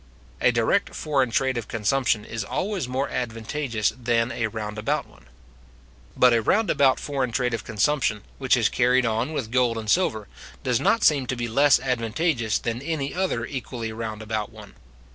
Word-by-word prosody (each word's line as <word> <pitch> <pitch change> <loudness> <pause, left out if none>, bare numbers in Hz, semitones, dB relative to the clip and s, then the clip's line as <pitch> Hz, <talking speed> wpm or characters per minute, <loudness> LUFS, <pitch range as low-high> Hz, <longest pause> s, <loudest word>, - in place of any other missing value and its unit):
A - - +5
direct - - +1
foreign 135 -5 +1
trade 130 +1 +1
of 110 - -8
consumption 110 0 0
is 115 -2 -4
always 190 - -2
more 130 +2 -1
advantageous 115 0 -2
than 120 -1 0
a 115 -5 -1
round 105 -1 -5
about 140 +6 -1
one. - - -21 0.9
But 125 -1 +6
a 115 - +3
round 210 - +2
about 140 -3 +3
foreign 135 -4 -2
trade 125 0 0
of 115 - -3
consumption, 110 -1 0 0.2
which 130 -1 +3
is 115 -3 +3
carried 125 +2 +2
on 115 +5 0
with 115 -8 -4
gold 125 -2 +2
and 110 -2 -2
silver, 110 - +1 0.4
does 125 -3 +1
not 230 - +2
seem 140 -4 +4
to 130 - -1
be 120 -1 -3
less 140 +5 +4
advantageous 125 -1 0
than 115 +1 -3
any 145 -2 -3
other 180 -10 -1
equally 120 -4 -5
round 110 -1 -5
about 110 -1 -3
one. - - -13
120 Hz, 180 wpm, -24 LUFS, 110-135 Hz, 0.9 s, But